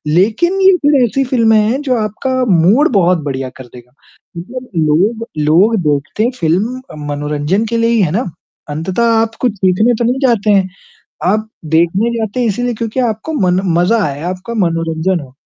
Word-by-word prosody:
लेकिन 230 - +2
ये 380 0 +6
फिर 290 -3 +4
ऐसी 270 +4 0
फ़िल्में 230 -4 +3
हैं 230 +7 0
जो 260 -3 0
आपका 220 +5 -2 0.2
मूड 200 - +4
बहुत 180 -2 +3
बढ़िया 135 -2 -4
कर 130 - -10
देगा। 125 +1 -15 0.4
मतलब 250 +8 -8
लोग 190 +9 +1 0.2
लोग 190 +9 +4
देखते 150 - 0
फ़िल्म 200 +11 0 0.3
मनोरंजन 150 +8 -1
के 230 +1 -2
लिए 230 0 +2
ही 230 -3 +2
हैं 170 - +1
ना, 225 +9 -1 0.4
अंततः 180 +9 -2 0.2
आप 225 0 -2
कुछ 245 -5 +1
सीखने 190 +6 +2
तो 235 - -2
नहीं 250 +3 0
जाते 225 -3 +1
हैं, 195 -2 +3 0.6
आप 215 +4 +1 0.2
देखने 170 +8 +1
जाते 220 +2 -3
हैं 245 - +1
इसीलिए 245 +3 -1
क्योंकि 225 +3 -3
आपको 225 +6 -2
मन 185 -8 +1 0.2
मज़ा 180 +7 +2
आए, 145 0 -4
आपका 185 +5 -5
मनोरंजन 165 -1 0
हो, 130 -2 -13
210 Hz, 175 wpm, -14 LUFS, 170-235 Hz, 0.6 s, ये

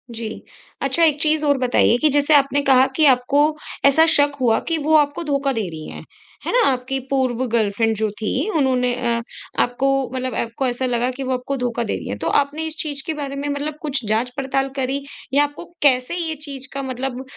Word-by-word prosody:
जी। 225 0 -4 0.5
अच्छा, 275 +5 +2
एक 300 -3 +3
चीज़ 310 -1 +2
और 285 -1 +3
बताइए 245 -2 +3
कि 310 - +4
जैसे 290 +2 +2
आपने 280 0 +3
कहा 260 0 +6
कि 310 - +4
आपको 265 +1 +3 0.4
ऐसा 280 +4 +6
शक 290 0 +3
हुआ 230 -3 +3
कि 330 - +1
वो 310 +2 +1
आपको 295 +2 0
धोखा 280 -2 0
दे 220 -5 -2
रही 155 -2 -8
हैं, - - -9 0.4
है - - -1
ना? - - +4
आपकी 260 +1 -2
पूर्व 260 -2 0
गर्लफ्रेंड 225 0 +1
जो 215 0 0
थी 220 - -1
उन्होंने 255 -3 +1
अ, 235 -2 0 0.4
आपको 245 +3 0 0.2
मतलब 255 -2 -3
आपको 235 +3 -2
ऐसा 245 +1 -2
लगा 245 0 0
कि 265 +2 -6
वो 260 0 -1
आपको 255 +2 -3
धोखा 240 -2 -2
दे 220 - -2
रही - - -8
हैं। - - -4
तो - - -3
आपने 290 +3 -4
इस 315 - -3
चीज़ 290 -3 -1
के 320 - -2
बारे 285 -2 -5
में 280 +1 -4
मतलब 290 +1 -3
कुछ 275 -4 -1
जाँच-पड़ताल 260 +4 -1
करी 270 +1 -2 0.3
या 285 +1 +5
आपको 290 +3 -5 0.2
कैसे 255 +2 +3
ये 330 -3 -1
चीज़ 275 -2 -5
का 275 0 -4
मतलब 260 0 -4
270 Hz, 210 wpm, -20 LUFS, 250-285 Hz, 0.5 s, कहा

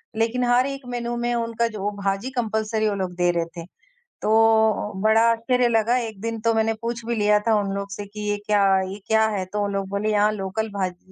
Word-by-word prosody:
लेकिन 230 +3 0
हर 245 +1 +3
एक 275 0 -5
मेनू 240 0 -3
में 240 0 -1
उनका 230 0 0
जो 205 -2 -3
भाजी 195 +5 -1
कंपल्सरी 220 -2 -1
वो 200 - -2
लोग 185 -2 -3
दे 175 0 +2
रहे 170 -1 -1
थे। 165 - -6 0.6
तो 220 -1 +3
बड़ा 220 +1 +4
आश्चर्य 245 +2 +1
लगा, 230 +1 +2
एक 225 -5 -4
दिन 230 0 -3
तो 230 0 +2
मैंने 225 0 +1
पूछ 235 0 -4
भी 235 - -1
लिया 210 -1 +3
था 225 - +4
उन 195 -1 -3
लोगों 200 0 -3
से 205 - -6
कि 210 +1 -9
ये 205 - 0
क्या 205 -1 +3 0.2
ये 190 +2 -5
क्या 220 -1 +3
है? 195 -3 -2
तो 205 +2 -3
उन 200 - -3
लोग 195 -1 -2
बोले 200 +2 -1
यहाँ 210 0 +3
लोकल 210 +2 -3
भाजी 185 -1 -4
220 Hz, 225 wpm, -23 LUFS, 200-230 Hz, 0.6 s, बड़ा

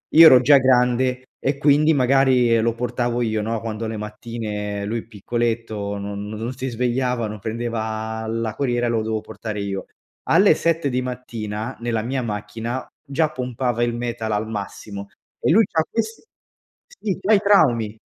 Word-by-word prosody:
Io 165 +1 +11
ero 130 -6 +9
già 140 +2 +7
grande 130 0 +2
e 135 +1 -1
quindi 150 +2 +4
magari 130 -3 +4
lo 115 +1 +1
portavo 120 0 -1
io, 110 -2 0
no, 115 +1 -2
quando 115 0 -4
le 110 0 -4
mattine 105 -1 -5
lui 115 +2 -3
piccoletto 110 -2 -2
non 100 0 -5
non 105 0 -6
no 115 +2 -3
si 130 +1 -4
svegliava, 125 -1 0
non 105 - -6
prendeva 110 0 -3
la 115 -1 -2
corriera 120 -3 0
e - - 0
lo 115 -2 0
dovevo 110 -1 -2
portare 105 -1 -6
io. 100 -1 -3 0.4
Alle 190 +5 +6
7 165 -3 +1
di 125 0 0
mattina 115 -2 -5
nella 115 -2 -1
mia 130 +4 -2
macchina 115 +3 -4 0.2
già 155 +2 0
pompava 125 -2 -2
il 120 0 0
metal 120 -2 -3
al 105 +1 -1
massimo 100 -1 -6 0.3
e - - +2
lui 220 +6 +6
c'ha 160 -3 0
ques 225 0 -3 0.6
sì, 220 - -4
c'ha 210 +3 +3
i 205 - +6
traumi. 120 - +3
120 Hz, 170 wpm, -22 LUFS, 110-130 Hz, 0.6 s, Io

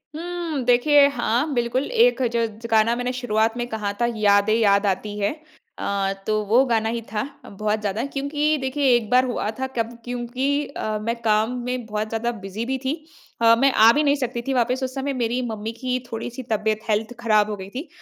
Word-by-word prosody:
हम्म 335 -4 -3
देखिए, 280 +4 +5
हाँ 250 +2 0
बिल्कुल, 240 +1 0
एक 480 - +4
ज - - +1 0.2
ज 230 - -6
गाना 220 +1 +4
मैंने 245 +1 -2
शुरुआत 225 -2 0
में 240 - -1
कहा 215 -3 -2
था, - - +4
"यादें 205 0 +3
याद 205 -2 +3
आती 205 +2 -5
हैं।" 200 +4 0 0.5
अ, 195 -1 -1
तो 215 0 +2
वो 235 +6 +4
गाना 225 -3 +1
ही 235 - -3
था, 210 -1 -1 0.2
बहुत 210 +2 -2
ज़्यादा 210 +1 -2
क्योंकि 295 +2 0
देखिए, 270 +2 0
एक 230 -3 -1
बार 255 +1 +4
हुआ 245 -4 -2
था 265 - -1
कब 230 0 -1
क्योंकि 245 +1 -3 0.2
अ, 215 -6 -3
मैं 230 +2 -1
काम 220 +1 +2
में 250 -2 -3
बहुत 215 0 -3
ज़्यादा 225 +1 -1
बिज़ी 205 +4 -4
भी 265 +2 -1
थी। 270 - +1 0.5
अ, 230 0 +7
मैं 270 +3 +4
आ 220 +1 +7
भी 300 - +2
नहीं 285 -1 +3
सकती 235 -1 -3
थी 270 - +1
वापस, 250 +1 +1
उस 260 +1 -4
समय 275 +1 -2
मेरी 240 +2 0
मम्मी 215 +1 -4
की 255 -1 -1
थोड़ी-सी 240 +3 -5
तबियत 215 0 +1
हेल्थ 220 +3 0
खराब 215 -3 +3
हो 210 - -2
गई 190 0 -8
थी। 290 +6 -5
235 Hz, 205 wpm, -23 LUFS, 215-260 Hz, 0.5 s, अ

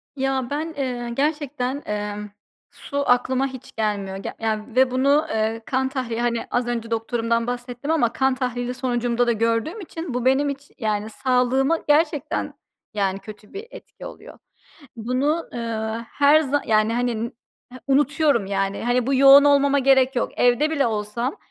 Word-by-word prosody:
Ya 265 -2 -1
ben, 310 +3 -3
eee, 250 -3 -3
gerçekten, 285 -1 -1
emm, 210 0 -4 0.4
su 280 -1 -4
aklıma 255 +2 +2
hiç 260 -2 -10
gelmiyor 200 -3 -2
ge 195 - -6
ya 220 -1 -1
ve 260 0 +4
bunu, 280 +4 +3
eee, 220 +1 -1
kan 265 0 0
tahlili, 240 -4 -3
hani, 235 -1 -1
az 245 0 0
önce 230 -1 -3
doktorumdan 230 +1 -1
bahsettim 245 +4 -4
ama 240 -8 +2
kan 265 -1 +1
tahlili 250 -1 -3
sonucumda 245 -1 0
da - - +4
gördüğüm 230 - 0
için 325 -5 -6
bu 250 0 -2
benim 275 +2 +3
iç 280 +1 -7
yani, 215 -1 -1
sağlığıma 260 +6 +1
gerçekten, 300 0 +1 0.4
yani, 195 -2 -1
kötü 210 0 -12
bir 415 +4 -7
etki - - -12
oluyor. - - -11 0.6
Bunu, 260 +8 -1
ııı, 230 -1 -3
her 290 +2 +4
za 290 -1 0
yani, 215 0 +3
hani, 235 -1 -1 0.5
unutuyorum 285 -4 +2
yani. 195 0 -2
Hani, 245 0 +1
bu 275 - +1
yoğun 275 +1 +8
olmama 280 0 +4
gerek 265 -1 +3
yok. - - 0
Evde 245 +5 +3
bile 285 -4 +1
olsam, 225 +4 -2
250 Hz, 155 wpm, -23 LUFS, 230-275 Hz, 0.6 s, yoğun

